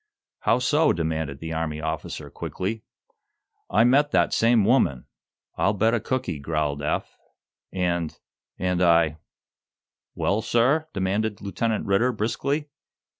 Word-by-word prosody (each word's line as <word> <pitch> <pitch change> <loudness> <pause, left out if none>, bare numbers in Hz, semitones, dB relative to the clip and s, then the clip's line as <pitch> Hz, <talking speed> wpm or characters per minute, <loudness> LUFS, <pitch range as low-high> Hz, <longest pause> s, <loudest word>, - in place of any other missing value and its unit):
"How 115 - +2
so?" 145 +5 +3
demanded 80 -4 -2
the 80 +3 -6
Army 80 -1 -2
officer 80 0 -5
quickly. 105 +4 -4 0.9
"I 105 +4 +4
met 140 +5 +4
that - - +2
same 115 -2 +4
woman, 105 - +2 0.5
I'll 105 - +3
bet 110 +3 +2
a 120 - +2
cookie," 110 - -2
growled 75 -1 -2
Eph, 75 +2 -2 0.6
"and 85 -3 -1 0.4
and 90 -1 0
I 85 -3 +4 0.5
" - - -66
"Well, 105 +3 0
sir?" 130 +8 +2
demanded 100 +2 -1
Lieutenant 105 +3 -2
Ridder, 100 +6 +2
briskly. 140 +7 -2
100 Hz, 125 wpm, -25 LUFS, 80-115 Hz, 0.9 s, I